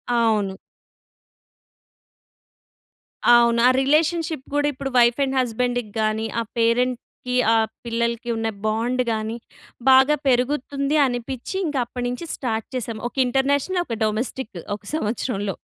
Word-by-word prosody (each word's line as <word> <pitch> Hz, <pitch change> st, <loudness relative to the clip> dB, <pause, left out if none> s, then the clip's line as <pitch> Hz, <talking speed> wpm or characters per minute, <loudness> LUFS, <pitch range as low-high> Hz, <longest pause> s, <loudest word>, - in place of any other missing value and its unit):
అవును. 215 Hz, -5 st, +1 dB, 2.8 s
అవును. 235 Hz, -1 st, +5 dB
ఆ -, -, +7 dB
రిలేషన్‌షిప్ 315 Hz, +1 st, +1 dB
కూడా 290 Hz, 0 st, +2 dB
ఇప్పుడు 270 Hz, +1 st, -5 dB
వైఫ్ 240 Hz, +2 st, +4 dB
అండ్ 265 Hz, 0 st, -1 dB
హస్బాండ్‌కి 245 Hz, -2 st, -1 dB
గాని, 215 Hz, +1 st, 0 dB
ఆ -, -, +1 dB, 0.2 s
పేరెంట్‌కి 250 Hz, +1 st, 0 dB, 0.2 s
ఆ -, -, +4 dB, 0.3 s
పిల్లలకి 235 Hz, +1 st, -2 dB
ఉన్న 225 Hz, 0 st, -1 dB, 0.2 s
బాండ్ 235 Hz, +4 st, 0 dB
గాని, 220 Hz, +1 st, -2 dB, 0.5 s
బాగా 265 Hz, +3 st, +6 dB
పెరుగుతుంది 275 Hz, +3 st, +1 dB
అనిపించి, 250 Hz, +7 st, -5 dB
ఇంక 300 Hz, -3 st, -3 dB
అప్పటినుంచి 245 Hz, +6 st, -4 dB
స్టార్ట్ 225 Hz, -4 st, -3 dB
చేసాం. 230 Hz, -3 st, -4 dB
ఒక -, -, -38 dB
ఇంటర్నేషనల్ 285 Hz, +8 st, +1 dB
ఒక 230 Hz, -2 st, -3 dB
డొమెస్టిక్ 225 Hz, +3 st, -3 dB, 0.2 s
ఒక 200 Hz, -, -38 dB
సంవత్సరంలో. 210 Hz, -, -2 dB
245 Hz, 115 wpm, -22 LUFS, 230-270 Hz, 2.8 s, ఆ